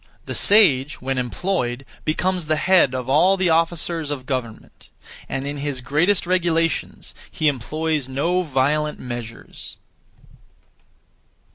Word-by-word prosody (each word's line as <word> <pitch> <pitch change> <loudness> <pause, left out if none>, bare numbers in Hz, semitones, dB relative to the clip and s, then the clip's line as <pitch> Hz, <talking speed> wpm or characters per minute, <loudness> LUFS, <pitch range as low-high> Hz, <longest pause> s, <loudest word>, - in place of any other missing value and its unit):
The - - -5
sage, 150 -10 +3
when 135 0 -2
employed, 125 -1 -2 0.2
becomes 180 +2 -1
the 155 - +2
Head 175 -5 +3
of 125 -1 -4
all 175 +8 +4
the 185 -3 +1
Officers 165 -1 0
(of 140 -3 -4
government); 125 -5 -6 0.4
and 135 +1 -3
in 145 +1 -4
his 140 -2 -3
greatest 155 +11 +1
regulations 170 -2 -1 0.2
he 155 - -1
employs 150 +1 -1
no 165 +7 0
violent 150 0 0
measures. 120 -2 -8
150 Hz, 120 wpm, -21 LUFS, 130-170 Hz, 0.4 s, all